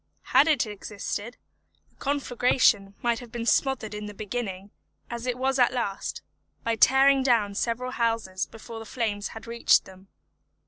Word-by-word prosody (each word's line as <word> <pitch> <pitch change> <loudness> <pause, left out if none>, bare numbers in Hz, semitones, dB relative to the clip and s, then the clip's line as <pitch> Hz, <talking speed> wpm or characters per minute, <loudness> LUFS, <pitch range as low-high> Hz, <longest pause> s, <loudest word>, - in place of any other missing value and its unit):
Had 295 - +7
it 295 -7 +3
existed, 210 +2 -6 0.5
the - - -35
conflagration 245 -7 +2
might 235 -1 +1
have 245 -2 -11
been 235 0 -4
smothered 235 -4 +1
in 210 0 -5
the 210 - -9
beginning, 205 -3 -5 0.4
as 235 +1 -5
it 250 -1 -1
was 265 +1 0
at 245 - +5
last, 205 -6 -3 0.4
by 230 0 0
tearing 270 +4 +5
down 230 -6 +2
several 240 +4 -2
houses 225 -6 -1
before 225 0 -10
the 225 - -8
flames 215 -4 -2
had 225 - -10
reached 235 0 +3
them. 190 +1 -15
230 Hz, 155 wpm, -26 LUFS, 210-250 Hz, 0.5 s, Had